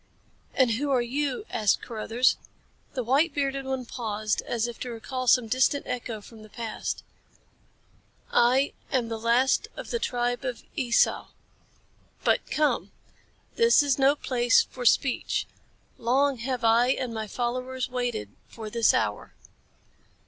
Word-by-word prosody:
"And 255 -3 +4
who 275 +6 -1
are 255 -3 +2
you?" 275 - -2
asked 210 -2 +1
Carruthers. 235 +2 +1 0.6
The 255 - -1
white 280 +6 +2
bearded 275 -1 -1
one 265 -1 -3
paused 215 -3 -2
as 235 -1 0
if 240 - -8
to 250 - -5
recall 250 +3 -5
some 245 0 +5
distant 260 +4 +2
echo 240 -3 -4
from 220 +1 -14
the 215 - -13
past. 225 +1 -5 1.3
"I 255 +4 +3 0.2
am 245 -4 0
the 225 -1 -4
last 235 +4 +2
of - - -7
the 470 - 0
tribe 245 - -1
of 250 -3 -4
Esau. 250 -6 +2 1.0
But - - +1
come! 300 -1 0 0.7
This 465 -9 +5
is 280 -2 +1
no 275 +2 +5
place 245 -4 +3
for 245 -1 -3
speech. 265 +1 +2 0.5
Long 265 +2 +2
have 250 0 -3
I 230 +2 +5
and 255 -2 -1
my 220 -1 -4
followers 255 +3 -3
waited 245 - -3 0.2
for 220 -2 -8
this 230 -1 +3
hour." 105 -1 -2
245 Hz, 140 wpm, -27 LUFS, 230-265 Hz, 1.3 s, some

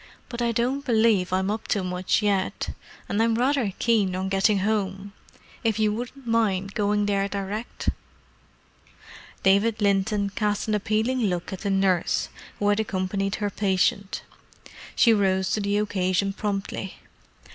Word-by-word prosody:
"But 240 -1 -5
I 235 -1 +2
don't 250 +4 0
believe 220 -7 +3
I'm 190 +2 +1
up 220 +1 -4
to 200 - 0
much 180 +3 0
yet—and 200 +1 -2
I'm 225 0 +3
rather 250 -3 +1
keen 210 -6 +2
on 190 +1 -2
getting 195 +2 +3
home. 200 -1 -1 0.5
If 225 -2 +1
you 215 -1 +2
wouldn't 245 +4 -6
mind 200 -4 +1
going 205 0 +1
there 200 -1 0
direct." 200 +3 -3 1.5
David 205 +3 +3
Linton 200 0 +1
cast 210 0 -1
an 215 - 0
appealing 220 +4 +1
look 180 -1 -2
at 190 - -5
the 200 - -2
nurse, 195 -3 +1 0.3
who 205 - +1
had 205 +1 +2
accompanied 195 -1 -1
her 205 -1 -2
patient. 200 +1 0 0.7
She 230 - +5
rose 190 -2 +1
to 215 - 0
the 200 0 0
occasion 195 -1 0
promptly. 195 -2 -3
205 Hz, 145 wpm, -25 LUFS, 195-220 Hz, 1.5 s, She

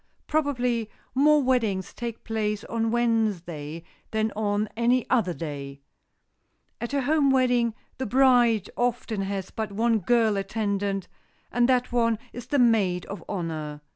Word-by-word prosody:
Probably 250 -7 0 0.2
more 295 +2 +4
weddings 225 -8 0
take 235 -2 -6
place 215 -2 -2
on 225 -1 -1
Wednesday 185 -10 -1 0.3
than 220 0 0
on 210 0 0
any 240 +2 +2
other 225 -8 +3
day. 140 -3 -6 1.0
At 240 +4 -3
a 275 - +1
home 290 +1 +3
wedding, 245 -3 +2 0.2
the 260 - -2
bride 245 -4 +4
often 240 -3 -1
has 195 -1 -3
but 220 -2 -4
one 225 +2 +2
girl 220 +1 +2
attendant, 200 -1 -2 0.4
and 245 +1 +2
that 250 -1 +2
one 230 -2 +2 0.2
is 245 - -8
the 290 - +1
maid 210 -8 +3
of 200 - -7
honor. 155 -5 -4
225 Hz, 140 wpm, -26 LUFS, 195-245 Hz, 1.0 s, more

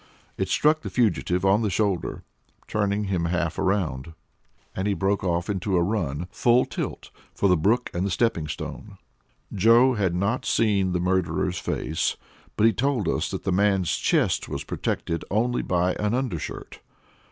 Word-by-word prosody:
It - - -2
struck 155 +1 +3
the - - -5
fugitive 95 -5 +1
on 100 +3 +4
the 110 - 0
shoulder, 100 -2 -1 0.4
turning 105 0 0
him 95 -4 -1
half 85 -1 -1
around; 80 -6 -1 0.6
and 95 +2 -1
he 100 - +1
broke 100 +1 0 0.2
into 95 -1 -1
a 85 - +3
run, 85 -5 -2
full 120 +1 +3
tilt, - - -5 0.2
for 100 - +2
the 90 - +5
brook 110 +10 +1
and 85 - -1
the 100 - 0
stepping 85 -5 0
stone. 75 - -7 0.6
Joe 115 +6 +5
had 95 -6 0
not 100 +7 0
seen 100 -5 +1
the 90 - 0
murderer's 95 0 0
face, 80 - -2 0.4
but 105 - +4
he 115 - +5
told 130 - 0
us - - 0
that - - -5
the - - -1
man's 95 -1 +2
chest - - +1
was - - -4
protected 85 0 -3
only 120 +4 +1
by 90 0 +1
an 105 +2 0
undershirt. 125 - -4
100 Hz, 165 wpm, -25 LUFS, 90-110 Hz, 0.6 s, the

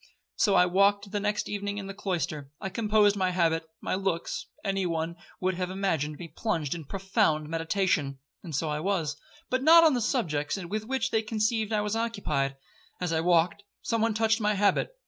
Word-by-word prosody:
So 200 -3 +3
I 180 - +6
walked 200 +2 +2
the 205 - -1
next 210 +1 -1
evening 205 0 -3
in 200 - -4
the 195 - -6
cloister. 160 -7 -3
I 195 - -4
composed 210 -1 +3
my 190 -2 +1
habit,—my 165 -2 -1
looks; 190 -3 -2 0.2
any 195 -2 0
one 165 0 -2 0.2
would 185 0 0
have 180 0 -3
imagined 165 -6 -1
me 175 - -7
plunged 160 -3 -2
in 165 -3 -7
profound 190 - 0
meditation,—and 160 -3 -2
so 160 +3 0
I 150 0 -1
was, 165 -4 -1 0.4
but 255 +1 +1
not 330 +4 +8
on 315 -3 +6
the 245 - 0
subjects 165 - 0
with 200 +4 -4
which 265 +1 -1
they 220 - +2
conceived 220 0 0
I 215 -1 +2
was 210 +1 -2
occupied. 200 -12 -1 0.4
As 180 -2 -1
I 160 - +1
walked, 175 +2 +2 0.2
some 230 -1 0
one 225 -1 +1
touched 220 0 +2
my 210 0 +2
habit. 200 - +2
195 Hz, 185 wpm, -28 LUFS, 165-210 Hz, 0.4 s, not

